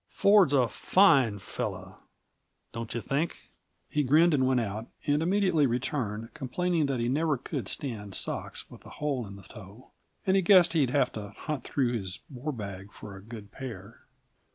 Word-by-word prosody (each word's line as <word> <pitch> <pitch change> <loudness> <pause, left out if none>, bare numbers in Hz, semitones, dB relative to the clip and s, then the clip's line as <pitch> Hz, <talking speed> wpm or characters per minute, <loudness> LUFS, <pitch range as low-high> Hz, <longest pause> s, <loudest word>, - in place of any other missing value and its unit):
Ford's 200 -6 +5
a 130 -4 +4
fine 135 - +4
fellow, 95 - -5 0.7
don't 115 -1 -5
you 120 - -2
think?" 145 - -3 0.4
He 150 - 0
grinned 155 +5 +4
and 130 -3 +3
went 130 -1 +3
out, 110 0 -4 0.2
and 145 +1 +2
immediately 180 -4 +3
returned, 115 -3 -2
complaining 165 +4 0
that 135 -3 -1
he 115 - 0
never 150 +3 +1
could 125 - -5
stand 105 -8 -5
socks - - -4
with - - -13
a - - -12
hole 140 -6 -2
in 100 - -9
the 100 - -13
toe, 110 +2 -13 0.3
and 190 -1 +3
he 195 - +4
guessed 180 -2 +6
he'd 145 -6 +3
have 130 -1 +2
to 105 -2 -6
hunt 150 -3 -4
through 125 -4 0
his 95 -6 -4
war 135 +4 -4
bag 100 -5 -7
for 100 - -10
a 95 - -10
good 105 -1 -10
pair. 115 -5 -9
130 Hz, 175 wpm, -28 LUFS, 110-150 Hz, 0.7 s, guessed